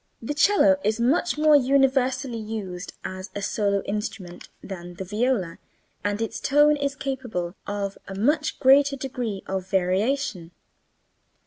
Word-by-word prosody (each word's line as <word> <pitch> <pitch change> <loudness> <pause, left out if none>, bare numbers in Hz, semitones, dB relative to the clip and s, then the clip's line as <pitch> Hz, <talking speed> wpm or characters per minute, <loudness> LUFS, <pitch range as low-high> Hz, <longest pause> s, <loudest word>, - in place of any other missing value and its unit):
The 235 +6 -4
cello 295 -1 +4
is 215 +2 0
much 290 +8 +1
more 305 0 +5
universally 265 -2 +2
used 205 -4 -6
as 185 +1 -6
a 205 - -3
solo 200 -1 0
instrument 200 -3 -5
than 175 -2 -8
the 190 - -5
viola 210 -3 -1 0.4
and 205 0 -1
its 225 - -4
tone 295 +1 +4
is 280 -1 -2
capable 245 -12 -4
of 200 -1 -3
a 195 - -7
much 295 +9 0
greater 275 +1 +5
degree 245 -7 -4
of 190 -1 -4
variation. 190 0 0
225 Hz, 135 wpm, -24 LUFS, 195-275 Hz, 0.4 s, more